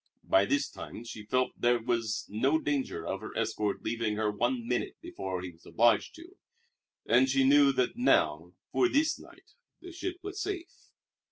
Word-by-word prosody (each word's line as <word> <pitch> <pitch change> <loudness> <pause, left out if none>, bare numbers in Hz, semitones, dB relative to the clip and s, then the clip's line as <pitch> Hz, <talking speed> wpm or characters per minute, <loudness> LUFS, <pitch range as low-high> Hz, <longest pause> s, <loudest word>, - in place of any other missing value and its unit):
By 95 +1 +4
this 140 +6 +1
time 120 - -9
she 110 -3 -9
felt 130 +2 +1
that - - -27
there 120 0 +3
was 115 -2 -1
no 130 +9 +2
danger 145 -3 -2
of - - -3
her - - -7
escort 105 -1 -1
leaving 115 -1 -1
her 105 0 0
one 120 +3 -1
minute 125 0 -1
before 95 -2 -5
he 90 - -6
was 80 0 -24
obliged 120 +1 +2
to; 345 +4 -14 0.7
and 130 +3 +4
she 135 +1 +3
knew 140 +1 +6
that 130 - 0
now, 250 - +2 0.2
for 370 - +3
this 305 +1 +2
night, - - -17 0.3
the 360 - -10
ship 360 +1 -4
was 405 +1 -5
safe. 375 -3 -4
125 Hz, 180 wpm, -30 LUFS, -, 0.7 s, knew